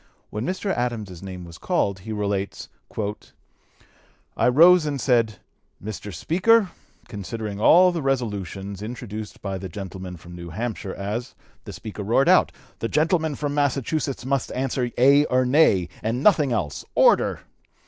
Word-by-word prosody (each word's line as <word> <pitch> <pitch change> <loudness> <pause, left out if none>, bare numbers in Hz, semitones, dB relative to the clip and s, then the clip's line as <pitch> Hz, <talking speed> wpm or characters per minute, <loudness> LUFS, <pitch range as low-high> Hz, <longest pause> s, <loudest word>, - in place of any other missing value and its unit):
When 105 +5 -3
Mr. 190 +2 -1
Adams's 110 -8 -3
name 95 -2 -7
was 85 0 -12
called, 100 -1 0
he 110 +4 -8
relates: 100 -2 -3 1.7
"I - - +2
rose 165 +5 +6
and 140 -2 -2
said, 115 -5 +2 0.4
'Mr. 105 0 -7
Speaker, 190 - +2 0.4
considering 105 0 -5
all 180 +9 +7
the 170 -2 -3
resolutions 100 - -3
introduced 110 -2 -7
by 95 -2 -3
the 95 0 -6
gentleman 95 0 -7
from 85 +2 -13
New 85 0 -8
Hampshire 105 +1 -4
as' 105 +5 -4 0.3
The - - -8
Speaker 110 -1 -7
roared 115 +7 +2
out, - - +5 0.3
'The 115 - -1
gentleman 160 0 +1
from 145 0 -3
Massachusetts 140 -1 -1
must 135 -1 -1
answer 130 -1 -1
Aye 140 +4 +5
or 130 0 +2
No, 125 - +4 0.2
and 115 +5 -2
nothing 155 -10 +4
else. 90 -11 -2
Order!' - - +4
115 Hz, 145 wpm, -24 LUFS, 100-140 Hz, 1.7 s, all